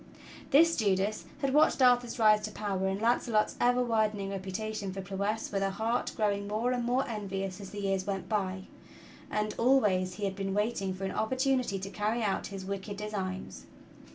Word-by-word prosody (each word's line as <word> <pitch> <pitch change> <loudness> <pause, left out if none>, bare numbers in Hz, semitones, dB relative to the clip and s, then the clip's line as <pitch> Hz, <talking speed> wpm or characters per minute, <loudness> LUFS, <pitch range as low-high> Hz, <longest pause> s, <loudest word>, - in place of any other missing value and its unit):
This 330 +4 +6
Judas 205 0 0 0.2
had 275 -2 0
watched 300 0 +4
Arthur's 245 -2 +4
rise 215 -2 +5
to - - -6
power 195 -2 -2
and 190 +1 -1
Launcelot's 230 -1 +2
ever 245 +1 +4
widening 215 -4 0
reputation 200 +1 -4
for 195 - -6
prowess 200 +3 -2
with 195 -1 -1
a 195 - +1
heart 225 +5 -1
growing 200 -2 0
more 220 +4 0
and 245 -1 0
more 250 +3 +1
envious 195 -3 -4
as 195 - -8
the 205 - -6
years 195 -1 -1
went 195 -2 -3
by; 190 -3 -1 0.7
and 210 0 -1
always 205 -8 +3
he 205 - -3
had 195 -1 -2
been 195 0 -2
waiting 210 -2 0
for 190 - -7
an 195 - -1
opportunity 255 -2 0
to 195 +1 -5
carry 215 +3 -1
out 200 -2 -1
his 195 -2 -7
wicked 200 +1 -5
designs. 195 -3 -5
210 Hz, 180 wpm, -30 LUFS, 195-230 Hz, 0.7 s, This